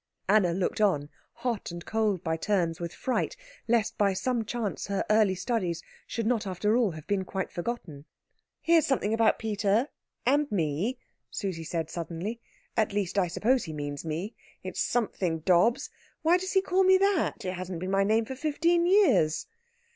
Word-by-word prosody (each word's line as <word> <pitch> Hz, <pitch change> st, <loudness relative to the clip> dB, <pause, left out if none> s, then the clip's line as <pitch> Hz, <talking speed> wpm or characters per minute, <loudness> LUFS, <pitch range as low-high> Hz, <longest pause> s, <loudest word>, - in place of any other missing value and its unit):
Anna 200 Hz, -4 st, +4 dB
looked 185 Hz, +4 st, -1 dB
on, 150 Hz, -9 st, +2 dB, 0.2 s
hot 235 Hz, -3 st, -3 dB
and 170 Hz, 0 st, -8 dB
cold 215 Hz, -5 st, 0 dB
by 160 Hz, -1 st, 0 dB
turns 170 Hz, -2 st, 0 dB
with 170 Hz, -1 st, -4 dB
fright 255 Hz, -, -2 dB, 0.3 s
lest 225 Hz, -1 st, +1 dB
by 200 Hz, -2 st, +3 dB
some 230 Hz, +5 st, -1 dB
chance 220 Hz, -2 st, -3 dB
her 200 Hz, -1 st, -1 dB
early 210 Hz, -3 st, +4 dB
studies 180 Hz, -3 st, -2 dB, 0.2 s
should 230 Hz, -, -3 dB
not 225 Hz, -3 st, +1 dB
after 210 Hz, +4 st, +1 dB
all 240 Hz, -4 st, +3 dB
have 155 Hz, -3 st, -8 dB
been 200 Hz, -2 st, 0 dB
quite 190 Hz, 0 st, -4 dB
forgotten. 175 Hz, -8 st, -5 dB, 0.6 s
"Here's 330 Hz, -2 st, +4 dB
something 235 Hz, -6 st, +1 dB
about 225 Hz, 0 st, +3 dB
Peter 215 Hz, +3 st, +1 dB, 0.4 s
and 285 Hz, +3 st, +2 dB
me," 180 Hz, -, 0 dB, 0.3 s
Susie 185 Hz, -5 st, -4 dB
said 165 Hz, 0 st, -3 dB
suddenly. 175 Hz, +7 st, -5 dB, 0.3 s
"At 220 Hz, -2 st, +1 dB
least, 200 Hz, -1 st, 0 dB
I 180 Hz, -, +2 dB
suppose 240 Hz, +8 st, +1 dB
he 160 Hz, -, -6 dB
means 145 Hz, -1 st, -5 dB
me. 165 Hz, +7 st, -4 dB, 0.3 s
It -, -, -4 dB
is -, -, -5 dB
something 185 Hz, -8 st, 0 dB
Dobbs. 190 Hz, -, +3 dB, 0.3 s
Why 335 Hz, +3 st, +5 dB
does 375 Hz, +1 st, -4 dB
he 385 Hz, -1 st, +4 dB
call 380 Hz, 0 st, +2 dB
me 375 Hz, 0 st, +6 dB
that? 380 Hz, -, +1 dB
It 185 Hz, -, -2 dB
hasn't 185 Hz, -1 st, -5 dB
been 185 Hz, +2 st, -3 dB
my 195 Hz, 0 st, +3 dB
name 220 Hz, +3 st, +2 dB
for 265 Hz, -, -5 dB
fifteen 335 Hz, +5 st, +1 dB
years." 360 Hz, -, +4 dB
205 Hz, 175 wpm, -28 LUFS, 175-240 Hz, 0.6 s, me